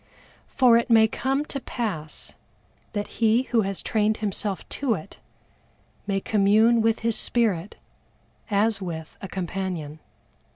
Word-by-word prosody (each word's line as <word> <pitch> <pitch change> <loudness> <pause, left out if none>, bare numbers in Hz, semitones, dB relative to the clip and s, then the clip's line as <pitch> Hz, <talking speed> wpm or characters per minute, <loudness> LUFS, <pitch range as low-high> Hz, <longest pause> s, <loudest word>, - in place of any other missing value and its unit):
For 250 -4 +5
it 235 +2 0
may 225 -1 +6
come 270 +6 -1
to 275 - -5
pass 195 - -4 0.6
that 205 -1 -2 0.2
he 225 +2 +4
who 240 -3 +1
has 195 -2 -2
trained 215 0 +1
himself 205 -2 -3
to 260 -6 0
it, 180 +3 -10 0.9
may 195 -1 +1
commune 215 +4 +4
with 225 0 +1
his 230 -1 +1
spirit 210 -6 0 0.7
as 210 0 +2
with 160 -4 -6
a 195 - -5
companion. 180 -5 -4
215 Hz, 130 wpm, -25 LUFS, 195-230 Hz, 0.9 s, may